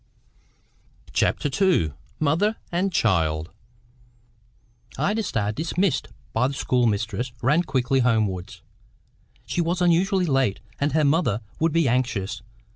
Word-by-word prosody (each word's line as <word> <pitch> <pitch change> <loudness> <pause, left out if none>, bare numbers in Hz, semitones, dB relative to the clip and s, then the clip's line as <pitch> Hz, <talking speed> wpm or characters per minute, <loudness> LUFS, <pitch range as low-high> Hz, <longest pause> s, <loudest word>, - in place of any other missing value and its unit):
CHAPTER - - +1 0.2
II 125 - +3 0.3
MOTHER 165 +9 +2 0.2
AND 185 +3 0
CHILD 80 - +1 1.5
Ida 215 +2 +1
Starr, 105 - -1
dismissed 160 - 0 0.3
by 120 +3 +2
the 140 - -4
schoolmistress, 120 -1 0
ran 150 +7 +4
quickly 135 -4 0
homewards. 110 -7 0 0.8
She 175 - -1
was 170 +2 -1
unusually 180 +2 +3
late, 135 - +1 0.2
and 145 0 0
her 155 -1 +3
mother 140 - +2 0.2
would 165 0 +2
be 165 -2 +2
anxious. 115 -5 -1
135 Hz, 115 wpm, -24 LUFS, 110-170 Hz, 1.5 s, ran